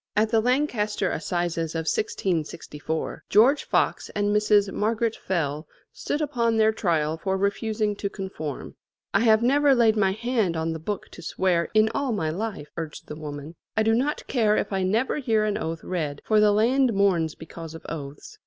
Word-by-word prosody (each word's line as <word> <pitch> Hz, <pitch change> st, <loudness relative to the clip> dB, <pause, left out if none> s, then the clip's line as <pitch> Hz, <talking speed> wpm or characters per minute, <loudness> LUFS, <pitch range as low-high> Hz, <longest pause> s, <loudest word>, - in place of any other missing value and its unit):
At 215 Hz, +1 st, +3 dB
the 225 Hz, -, +4 dB
Lancaster 225 Hz, -5 st, 0 dB
Assizes 165 Hz, -1 st, -2 dB
of 165 Hz, -, 0 dB
1664, 160 Hz, -4 st, -2 dB
George 255 Hz, +8 st, +4 dB
Fox -, -, 0 dB
and 205 Hz, 0 st, +1 dB
Mrs. 210 Hz, -1 st, +3 dB
Margaret 225 Hz, +1 st, 0 dB
Fell 155 Hz, -4 st, -2 dB, 0.3 s
stood 295 Hz, -, -3 dB
upon 235 Hz, -6 st, 0 dB
their 220 Hz, 0 st, +4 dB
trial 160 Hz, -7 st, 0 dB
for 190 Hz, +1 st, -1 dB
refusing 210 Hz, +1 st, 0 dB
to 200 Hz, -, -2 dB
conform. 190 Hz, -8 st, -6 dB, 0.4 s
"I 200 Hz, -, +4 dB
have 220 Hz, 0 st, +4 dB
never 280 Hz, +2 st, +4 dB
laid 230 Hz, -3 st, +4 dB
my 195 Hz, -3 st, +2 dB
hand 220 Hz, -6 st, 0 dB
on 160 Hz, 0 st, -1 dB
the 160 Hz, -, -5 dB
book 200 Hz, +5 st, -4 dB
to -, -, -12 dB
swear 170 Hz, 0 st, 0 dB
in 215 Hz, 0 st, +5 dB
all 280 Hz, -3 st, -1 dB
my 160 Hz, -7 st, -1 dB
life," 190 Hz, -5 st, -4 dB
urged 160 Hz, -2 st, -6 dB
the 150 Hz, -, -5 dB
woman. 150 Hz, 0 st, -7 dB, 0.2 s
"I 220 Hz, -, +4 dB
do 225 Hz, +1 st, +3 dB
not 270 Hz, +6 st, 0 dB
care 215 Hz, -5 st, +2 dB
if -, -, -2 dB
I 190 Hz, -, 0 dB
never 220 Hz, +10 st, +1 dB
hear 225 Hz, -5 st, +1 dB
an 210 Hz, -1 st, 0 dB
oath 165 Hz, -3 st, -4 dB
read, 155 Hz, -6 st, -3 dB
for 215 Hz, -1 st, +3 dB
the 210 Hz, 0 st, +5 dB
land 240 Hz, +4 st, +3 dB
mourns 180 Hz, -6 st, +2 dB
because 165 Hz, 0 st, -9 dB
of 160 Hz, -, -11 dB
oaths." 145 Hz, -3 st, -8 dB
205 Hz, 180 wpm, -25 LUFS, 165-225 Hz, 0.4 s, in